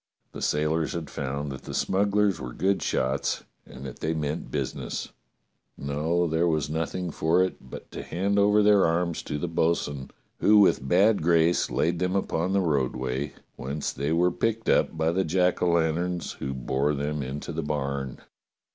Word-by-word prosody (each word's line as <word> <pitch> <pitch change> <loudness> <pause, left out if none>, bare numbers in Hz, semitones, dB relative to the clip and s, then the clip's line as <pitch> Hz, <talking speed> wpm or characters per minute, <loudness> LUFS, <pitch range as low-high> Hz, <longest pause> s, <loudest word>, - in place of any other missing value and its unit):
The - - -8
sailors 75 +2 0
had 80 -5 -5
found 70 +1 -3
that 65 - -7
the - - -5
smugglers 100 -2 +1
were 65 -2 -6
good 100 +1 +1
shots 65 +2 -1 0.2
and 65 +2 -10
that 65 - -8
they 80 +1 -1
meant 75 +1 -3
busi - - -2
ness. - - -5 0.7
No, 75 +5 0
there 80 +1 +1
was 75 -3 0
nothing 85 +2 -2
for 80 +4 +2
it 95 - -2
but - - -10
to - - -6
hand 100 +4 0
over 105 +1 +4
their 105 -1 +5
arms 85 0 0
to 75 - -4
the 80 - -2
bo'sun, 80 -4 -1 0.3
who 105 - +5
with 95 -9 +4
bad 100 +7 +4
grace 85 +1 +3
laid 85 +1 0
them 90 +1 0
upon 90 -2 0
the 100 - +3
roadway, 65 -3 -1 0.2
whence 70 +3 -3
they 70 +3 -2
were 90 +2 +3
picked 115 +5 -1
up - - +2
by 80 +1 +2
the 95 +3 +1
jack 90 +2 +1
o' 90 - +3
lanterns, 85 +1 0
who 70 - -3
bore 65 +3 0
them 75 +1 -2
into 70 +5 -5
the 80 0 -3
barn. 70 -3 -3
80 Hz, 180 wpm, -26 LUFS, 70-90 Hz, 0.7 s, their